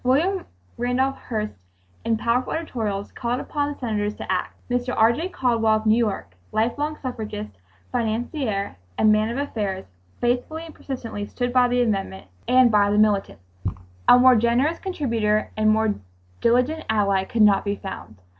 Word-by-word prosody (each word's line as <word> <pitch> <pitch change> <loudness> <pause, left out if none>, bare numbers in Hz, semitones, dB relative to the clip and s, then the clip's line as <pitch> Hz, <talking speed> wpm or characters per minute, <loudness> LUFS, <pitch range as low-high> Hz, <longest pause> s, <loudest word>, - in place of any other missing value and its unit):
William 330 +10 +1 0.3
Randolph 255 +3 0
Hearst 215 -3 -3 0.5
in 225 -1 +1
powerful 235 +3 0
editorials 220 -11 -3
called 240 +1 -2
upon 290 0 -2
the 290 - -8
Senators 210 -4 -2
to - - -5
act. 185 -1 -1
Mr. 245 0 -1
R. 225 +2 +5
J. 330 +9 -3
Caldwell 230 -8 +2
of 215 0 -2
New 215 0 +5
York, 210 - -1 0.2
life 225 +2 +1
long 305 +1 -2
suffragist, 215 - -5 0.4
financier 220 - -2 0.2
and 215 - +5
man 215 +1 +3
of 235 - -3
affairs, 210 -9 -3 0.3
faithfully 250 +7 -1
and 325 - -11
persistently 230 -6 -6
stood 245 -1 -3
by 250 -1 +5
the 245 0 +2
amendment 195 - -2 0.2
and 255 -1 +5
by 205 -1 +4
the 205 - +1
militants. 210 - +2 0.6
A - - +9
more 255 0 +7
generous 240 +8 +2
contributor 230 - 0
and 215 0 +3
more 220 0 +3 0.5
diligent 250 +7 +2
ally 200 -3 +2
could 220 +3 +2
not 205 -2 +5
be 200 0 -1
found. 110 - -8
230 Hz, 165 wpm, -23 LUFS, 210-255 Hz, 0.6 s, A